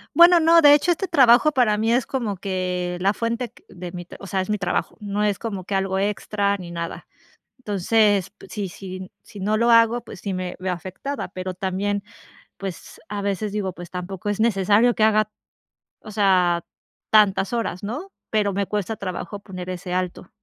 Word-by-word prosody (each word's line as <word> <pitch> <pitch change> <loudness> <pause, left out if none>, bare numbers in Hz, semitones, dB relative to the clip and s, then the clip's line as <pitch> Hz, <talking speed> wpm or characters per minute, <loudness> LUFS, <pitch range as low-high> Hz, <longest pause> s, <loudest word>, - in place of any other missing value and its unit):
Bueno, 345 +2 +8
no, 330 +1 +6
de 290 -1 +9
hecho, 320 +4 +2
este 365 +3 -1
trabajo 265 -1 +6
para 245 -7 +3
mí 225 +1 +1
es 245 +1 +2
como 230 -7 -2
que 180 -2 -2
la 195 +2 +3
fuente 235 +1 -2
q - - -22
de 180 -1 -8
mi 175 -1 -6
t - - -12
o 195 - -9
sea, 190 +1 0
es 185 - -5
mi 210 - 0
trabajo. 185 - -1
No 205 0 -2
es 205 -2 +1
como 200 -5 -4
que 195 - -6
algo 190 0 0
extra 200 0 0
ni 180 -3 -9
nada. 170 -1 -6 0.5
Entonces, 205 -3 +2
pues, - - -14
sí, 205 -3 -3
sí, 185 0 -8
sí 215 -3 -11
no 210 +3 +1
lo 235 +2 +3
hago, 230 +1 +5
pues 205 - -11
sí, 200 - -3
me 185 -1 -3
veo 185 0 -1
afectada, 185 - -5
pero 185 0 -5
también, 195 +2 -2 0.5
pues, 190 -3 -7
a 205 -1 -4
veces 200 +1 -2
digo: 200 -3 -1
"Pues 175 -1 -10
tampoco 185 +2 -6
es 205 +1 -1
necesario 215 +2 +4
que 215 - +1
haga, 215 -1 +3 0.7
o - - -11
sea 185 -5 +3 0.5
tantas 205 -2 +4
horas", 225 -6 -2
¿no?, 290 - -5 0.2
pero, 210 -2 +1
me 200 +1 -1
cuesta 210 +2 -2
trabajo 200 +1 -5
poner 185 -3 -8
ese 180 0 -4
alto. 180 -1 -3
200 Hz, 195 wpm, -23 LUFS, 185-225 Hz, 0.7 s, de